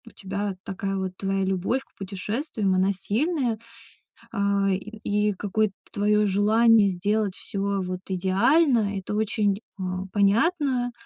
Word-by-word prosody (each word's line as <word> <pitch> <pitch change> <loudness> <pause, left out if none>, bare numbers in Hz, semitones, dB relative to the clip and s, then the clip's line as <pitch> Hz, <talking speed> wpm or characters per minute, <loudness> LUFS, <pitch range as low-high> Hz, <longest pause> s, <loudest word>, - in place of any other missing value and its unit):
тебя 200 0 -3
такая 195 -1 -3
вот 190 -1 -2
твоя 195 0 -1
любовь 190 +7 0
к - - -38
путешествиям, 200 - -2
она 190 +2 +2
сильная, 235 - -1 0.7
а, 200 -2 +1
и 210 +3 -4 0.3
и - - 0
какое-то 205 +1 0 0.2
твое 210 +1 +2
желание 210 +1 +4
сделать 200 +2 0
всё, 200 -1 -2
вот, 180 0 -4
идеально- 205 - +3
это 195 +2 -5
очень, 210 -1 +1 0.2
а, 185 0 -3
понятно. 245 - +2
200 Hz, 125 wpm, -25 LUFS, 195-220 Hz, 0.7 s, желание